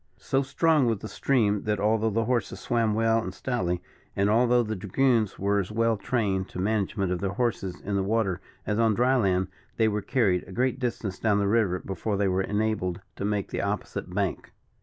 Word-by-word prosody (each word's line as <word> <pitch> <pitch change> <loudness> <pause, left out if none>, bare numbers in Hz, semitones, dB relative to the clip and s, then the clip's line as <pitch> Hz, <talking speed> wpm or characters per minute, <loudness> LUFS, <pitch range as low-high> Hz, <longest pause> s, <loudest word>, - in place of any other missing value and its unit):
So 135 - 0
strong 150 0 +2
was 115 -2 +1
the 110 - -7
stream 105 -5 +1
that, 105 -1 0
although 110 +1 +2
the 115 +2 0
horses 120 0 -1
swam 115 -3 +1
well 115 0 +3
and - - -5
stoutly, 90 -9 -2 0.3
and 100 +1 +2
although 120 +2 +4
the 110 -1 -3
dragoons 110 +3 +1
were 100 +1 +1
as 95 +1 -3
well 115 +1 +2
trained 100 -4 -1
to - - -9
the 90 - -1
management 100 -2 0
of 90 - -1
their 95 +1 -2
horses 105 -7 -2
in 100 0 -3
the 100 - +2
water 100 -3 0 0.2
as 105 +1 -1
on 110 -2 +3
dry 125 +4 +3
land, 95 -6 +1 0.3
they 110 - +4
were 105 -1 0
carried 100 -7 +1
a - - -10
great 130 +4 0
distance 115 -6 -3
down 105 -2 +2
the 100 -1 +1
river 100 -4 +2
before 95 +3 -3
they 100 0 +2
were 95 0 +1
enabled 105 -3 -1 0.2
to - - -3
make 105 -1 -1
the - - -2
opposite - - -3
bank. 100 0 -2
105 Hz, 210 wpm, -27 LUFS, 95-115 Hz, 0.3 s, although